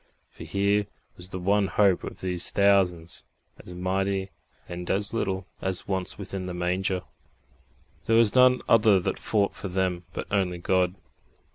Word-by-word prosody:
For - - -10
here 100 +1 +1 0.3
was 90 +1 -5
the 95 - -5
one 100 +2 +2
hope 100 -3 +3
of - - -7
these 90 -1 -1
thousands, 95 -4 +2 0.4
as 90 - -10
mighty 95 +1 -1 0.4
and 90 0 -6
as 100 +2 0
little 95 -4 -1 0.2
as 95 -1 -1
once 95 -2 -2
within 95 -1 -5
the 90 - -5
Manger. 90 +1 -1 1.0
There 115 - +3
was 115 -2 +5
none 125 0 +5
other 105 -3 +5
that 90 - -2
fought 100 -2 +1
for 100 - -6
them 90 -2 -1
but - - -5
only 95 -3 +1
God. 90 +1 +1
95 Hz, 155 wpm, -26 LUFS, 90-100 Hz, 1.0 s, was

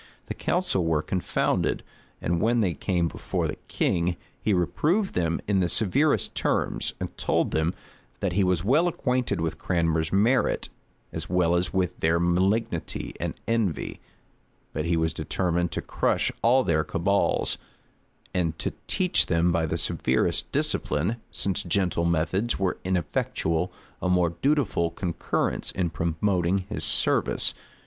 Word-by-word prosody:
The - - -4
council 95 - 0
were 80 -2 +1
confounded; 90 -2 0 0.4
and 85 0 0
when 115 +1 +3
they 95 -5 +1
came 85 0 0
before - - -2
the - - -5
king, 85 0 0 0.2
he 110 - +1
reproved 145 - +1
them 85 -1 0
in 100 -2 +2
the 90 -2 +1
severest 135 - +2
terms; - - 0
and - - -5
told - - +1
them, 80 +3 0 0.4
that 100 -3 -1
he 100 +2 +3
was 90 -2 +1
well 145 - +4
acquainted 125 - 0
with 80 -1 -2
Cranmer's 80 -3 0
merit, 115 +7 +2 0.4
as - - -5
well 90 -1 +2
as 90 +1 +1
with 90 -2 -1
their 80 +1 +2
malignity 90 +2 0
and - - -3
envy; 115 -8 -1 0.7
but 75 +2 -2
he 85 0 +1
was 80 0 +1
determined 90 -1 -1
to - - -3
crush - - +1
all 130 +3 +4
their 80 -5 +2
cabals, 100 +6 +1 0.7
and 85 -3 0
to - - -3
teach 180 -1 +2
them 85 0 +2
by 80 -1 +1
the - - -1
severest - - +1
discipline, 85 +10 0
since 95 -3 -1
gentle 90 -1 0
methods 85 +7 +1
were 95 -2 -1
ineffectual, 90 -1 -1 0.3
a 90 - 0
more 90 -2 +3
dutiful 135 - +2
concurrence 85 0 -2
in 90 -3 -1
promoting 90 +3 0
his - - -2
service. - - +2
90 Hz, 145 wpm, -26 LUFS, 85-100 Hz, 0.7 s, well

